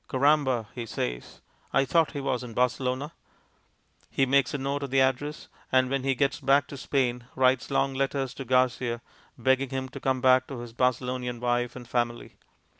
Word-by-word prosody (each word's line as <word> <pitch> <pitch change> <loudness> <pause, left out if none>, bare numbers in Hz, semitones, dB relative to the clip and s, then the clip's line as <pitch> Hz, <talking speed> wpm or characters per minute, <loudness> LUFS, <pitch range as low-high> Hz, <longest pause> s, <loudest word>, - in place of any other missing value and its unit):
"Caramba!" 135 -3 +2
he 120 -2 -6
says, - - -4 0.3
"I 135 - +3
thought 165 +4 +2
he 145 - -3
was 130 -2 -1
in 115 -2 -9
Barcelona." 130 +3 0 1.0
He 135 - +2
makes 135 0 +3
a - - -2
note 140 +1 -2
of 140 - -4
the 135 +1 +2
address, 135 +3 0 0.2
and 130 0 +3
when 135 -1 0
he 135 -1 +1
gets 140 +1 +1
back 140 0 +3
to - - -7
Spain 125 -3 -1
writes 130 -1 +2
long 135 0 +1
letters 135 -1 -1
to 135 - -6
Garcia 125 -1 +1 0.3
begging 130 +2 +2
him 130 0 -3
to - - -8
come 130 -1 0
back 130 0 +4
to 135 - -6
his 120 -1 -9
Barcelonian 125 0 -1
wife 120 0 0
and 125 -2 -9
family. 120 -1 -2
130 Hz, 185 wpm, -27 LUFS, 125-135 Hz, 1.0 s, back